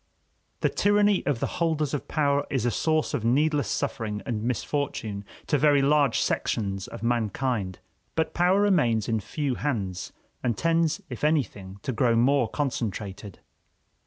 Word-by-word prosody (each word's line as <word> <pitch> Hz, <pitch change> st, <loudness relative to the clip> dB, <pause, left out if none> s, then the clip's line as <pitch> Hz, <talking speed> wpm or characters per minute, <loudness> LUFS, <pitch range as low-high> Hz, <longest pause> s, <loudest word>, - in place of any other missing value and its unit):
The -, -, +3 dB
tyranny 205 Hz, -1 st, +3 dB
of 140 Hz, -5 st, +1 dB
the -, -, 0 dB, 0.2 s
holders 155 Hz, -4 st, +1 dB
of 145 Hz, -, -3 dB
power 140 Hz, -2 st, +1 dB
is 130 Hz, -4 st, -1 dB
a 120 Hz, -, +2 dB
source 155 Hz, +5 st, 0 dB
of 110 Hz, -, -1 dB
needless 145 Hz, +2 st, +2 dB
suffering 105 Hz, -3 st, -2 dB
and 115 Hz, -5 st, -2 dB
misfortune 115 Hz, -3 st, -2 dB, 0.2 s
to 150 Hz, -, +1 dB
very 145 Hz, -1 st, +4 dB
large 140 Hz, -3 st, +3 dB
sections 95 Hz, -3 st, -1 dB
of -, -, -9 dB
mankind; 115 Hz, -4 st, -1 dB, 0.4 s
but 160 Hz, 0 st, 0 dB
power 180 Hz, +3 st, +3 dB
remains 150 Hz, -, +2 dB
in 110 Hz, -1 st, +1 dB
few 140 Hz, +6 st, -2 dB
hands, 100 Hz, -10 st, -3 dB, 0.3 s
and 120 Hz, -2 st, -1 dB
tends, 165 Hz, +2 st, +1 dB
if -, -, -7 dB
anything, 110 Hz, -11 st, 0 dB
to -, -, -1 dB
grow 120 Hz, -1 st, +2 dB
more 125 Hz, +1 st, +3 dB
concentrated. 105 Hz, -, -4 dB
130 Hz, 150 wpm, -26 LUFS, 110-150 Hz, 0.4 s, very